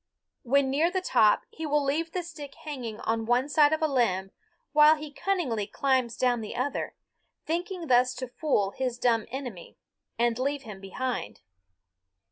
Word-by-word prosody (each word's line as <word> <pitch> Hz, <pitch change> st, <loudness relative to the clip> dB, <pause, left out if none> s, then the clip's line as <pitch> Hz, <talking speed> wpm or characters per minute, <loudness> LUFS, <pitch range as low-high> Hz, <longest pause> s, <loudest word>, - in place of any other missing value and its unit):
When 270 Hz, +2 st, +2 dB
near 310 Hz, +5 st, +3 dB
the 375 Hz, +1 st, -1 dB
top 235 Hz, -, +3 dB
he 320 Hz, -1 st, -5 dB
will 295 Hz, 0 st, +2 dB
leave 315 Hz, +4 st, -1 dB
the 360 Hz, 0 st, -2 dB
stick 300 Hz, -5 st, -9 dB
hanging 245 Hz, -8 st, -6 dB
on 225 Hz, 0 st, -1 dB
one 245 Hz, +3 st, +2 dB
side 295 Hz, 0 st, +4 dB
of 315 Hz, 0 st, 0 dB
a -, -, +4 dB
limb 195 Hz, -9 st, +1 dB, 0.4 s
while 300 Hz, +1 st, +7 dB
he 300 Hz, -1 st, -8 dB
cunningly 270 Hz, -, -1 dB
climbs 255 Hz, 0 st, 0 dB
down 245 Hz, -2 st, +2 dB
the 215 Hz, -, -6 dB
other, 265 Hz, +4 st, -2 dB, 0.5 s
thinking 350 Hz, +2 st, -3 dB
thus 250 Hz, -2 st, +3 dB
to 255 Hz, 0 st, -5 dB
fool 240 Hz, -7 st, 0 dB
his 255 Hz, -1 st, -3 dB
dumb 230 Hz, -3 st, +1 dB
enemy 245 Hz, -8 st, -7 dB, 0.4 s
and 235 Hz, 0 st, +1 dB
leave 280 Hz, +2 st, -1 dB
him 210 Hz, -4 st, -9 dB
behind. 215 Hz, -, -4 dB
260 Hz, 165 wpm, -28 LUFS, 235-300 Hz, 0.5 s, while